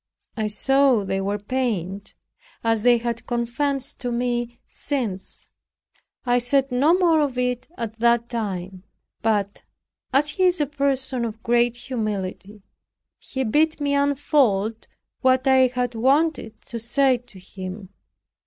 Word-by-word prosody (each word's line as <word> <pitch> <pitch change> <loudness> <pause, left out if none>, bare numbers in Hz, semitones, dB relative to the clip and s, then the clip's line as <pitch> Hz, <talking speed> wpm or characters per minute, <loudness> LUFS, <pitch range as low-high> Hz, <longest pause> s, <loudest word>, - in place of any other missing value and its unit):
I 220 -2 -1
saw 270 +1 +3
they 195 0 -1
were 200 +1 -1
pained, 205 -4 -3 0.5
as 225 -1 +2
they 240 +1 +5
have 235 0 -4
confessed 265 +4 -2
to 245 -2 -3
me 240 0 -2
since. 225 -10 -4 0.8
I 245 0 +3
said 270 +2 +1
no 285 +7 +4
more 340 -4 +3
of 275 -4 -1
it 250 0 -1
at 225 -1 -5
that 235 0 +3
time. 190 -6 -4 0.4
But, 205 -2 0 0.5
as 285 +2 +3
he 370 +5 +1
is 360 -1 +3
a 295 - +2
person 270 -3 -1
of 225 -1 -5
great 240 0 +2
humility, 210 -5 -4 0.6
he 265 -1 -4
bid 305 +7 +2
me 285 -1 0
unfold 275 -7 +1 0.3
what 260 0 +3
I 260 -1 +5
had 250 -1 -2
wanted 265 -1 +1
to 235 - -6
say 255 +3 +2
to 235 -5 -16
him. 185 +1 -8
240 Hz, 135 wpm, -23 LUFS, 215-270 Hz, 0.8 s, they